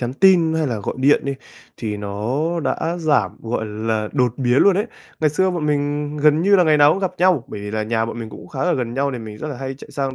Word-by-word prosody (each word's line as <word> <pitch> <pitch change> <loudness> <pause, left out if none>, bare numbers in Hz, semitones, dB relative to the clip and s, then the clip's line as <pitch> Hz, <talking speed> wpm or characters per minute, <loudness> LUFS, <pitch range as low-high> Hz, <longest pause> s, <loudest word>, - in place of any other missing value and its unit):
nhắn 125 0 -2
tin 170 -2 +4
hay 160 -1 0
là 115 -5 -2
gọi 100 - -4
điện 140 +3 +4
đi, 140 0 -2 0.4
thì 105 -3 -4
nó 120 +12 -2
đã 165 +3 -1
giảm, 155 -3 +1
gọi 115 -1 -2
là, 110 0 -2
đột 125 -5 +1
biến 125 -1 +2
luôn 195 -2 +5
ấy. 210 +3 0 0.3
Ngày 155 -2 +3
xưa 190 +5 +1
bọn 170 -4 -2
mình 145 0 -1
gần 150 +2 +3
như 200 +1 +5
là 180 - +4
ngày 155 -1 +4
nào 145 +1 +6
cũng - - -2
gặp 190 -2 0
nhau. 180 -8 +3
Bởi 105 - -7
vì 105 0 -6
là 110 0 -2
nhà 110 +1 0
bọn 115 +1 -6
mình 110 -2 -6
cũng - - -11
khá 135 - -6
ở 180 - +2
gần 120 -3 -3
nhau 140 +1 0
thì 125 - -4
mình 110 -2 -8
rất 155 - -5
là 140 - -5
hay 135 0 -5
chạy 135 - -13
sang 135 -2 -3
140 Hz, 280 wpm, -20 LUFS, 115-160 Hz, 0.4 s, nào